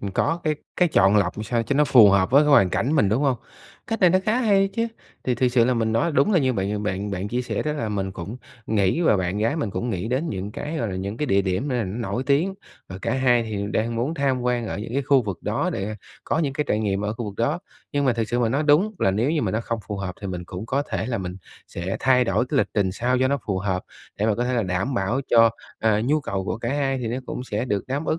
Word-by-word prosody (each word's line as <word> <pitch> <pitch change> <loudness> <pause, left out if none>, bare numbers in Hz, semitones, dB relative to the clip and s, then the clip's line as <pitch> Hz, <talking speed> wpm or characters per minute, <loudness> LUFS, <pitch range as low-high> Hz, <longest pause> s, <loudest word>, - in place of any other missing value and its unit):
ừm, 100 - -4
có 165 - 0
cái 155 -1 +1 0.2
cái 180 - +3
chọn 100 -8 +4
lọc 95 -2 +1
làm 110 - -2
sao 115 +2 0
cho 140 - -2
nó 150 +1 +4
phù 115 -7 +7
hợp 95 0 +3
với 140 +3 +6
cái - - +1
hoàn 100 -11 +6
cảnh 135 +6 0
mình, 105 -8 +4
đúng 115 +8 +1
hông? 135 -4 +2 0.5
Cách 225 0 -3
này 180 -3 +6
nó 185 - +4
khá 230 +4 +2
hay 195 -4 +3
chứ. 230 0 0 0.4
Thì 125 - +1
thực 125 +1 +2
sự 120 -1 +3
là 125 +1 +2
mình 110 -1 0
nói 150 +9 +1
đúng 145 +10 +3
là 180 - +5
như 130 -4 +2
bạn 100 0 -2
bạn 100 0 -2
bạn 100 +1 -3
chia 125 +2 -1
sẻ - - -2
đó, 150 - -1
là 115 -7 -3
mình 95 -2 -2
cũng 95 +6 -7 0.3
nghĩ 105 - +1
và 160 -11 +4
bạn 95 +2 -1
gái 115 +8 +1
mình 130 -10 -2
cũng 120 +3 -3
nghĩ 95 +3 -3
đến 135 +7 -1
những 100 +1 -4
cái, 150 +7 -5
gọi 115 -7 -1
là, 95 - -4
những 100 +3 -4
cái 150 - -2
địa 100 -4 +3
điểm 95 +9 -1
n 115 -4 -2
nổi 120 +2 -2
tiếng, 160 +8 +2 0.3
và 90 0 -7
cả - - 0
hai 125 -3 +3
thì 105 -3 -3
đang 115 +2 0
muốn 130 +8 -1
tham 135 -4 0
quan 120 -2 0
ở - - -4
những 110 +2 -6
cái 140 - +1
khu 135 -1 +4
vực 100 -5 -4
đó - - -1
để 105 +2 -3 0.3
có - - 0
những 150 -4 0
cái 150 +2 -1
trải 105 - +2
nghiệm 100 -2 0
ở 105 - -1
khu 115 0 -5
vực 100 -1 -6
đó. 145 +9 0 0.3
Nhưng 145 0 +1
mà 130 - +3
thực 115 -1 -2
sự 120 - 0
mà 120 -2 +2
nói, 140 +6 0
đúng 165 +9 +3
là 95 - +3
nếu 115 +9 +1
như 160 -3 0
mà 100 - 0
nó 110 +3 -1
không 115 0 -3
phù 105 - -4
hợp 95 -2 -4
thì 100 - -5
mình 90 -2 -5
cũng 90 +5 -7
có 140 +3 0
thể - - -3
là 120 -4 -2
mình 90 -1 -5 0.3
sẽ 90 +3 -4
thay 125 -1 +4
đổi 110 +4 +1
cái 140 - +1
lịch - - +2
trình 95 -3 +1
sao 125 +5 0
cho 130 0 +2
nó 140 - +1
phù 95 -3 0
hợp, 95 -2 -1 0.4
để 105 - +1
mà 110 - +2
có 120 - -1
thể 125 0 -1
là 115 - +1
đảm 95 +8 -1
bảo 115 +6 0
cho, 115 -1 +6 0.3
ờ, 110 -1 +2
nhu 150 +4 +2
cầu 95 -7 -3
của 110 - -3
cả 115 - -3
hai 135 -2 0
thì 120 -2 -3
nó 120 - -2
cũng 125 - -5
sẽ 105 -1 -2
được 105 -6 -2
đáp 135 +2 -2
ứng 160 - 0
115 Hz, 300 wpm, -23 LUFS, 100-140 Hz, 0.5 s, phù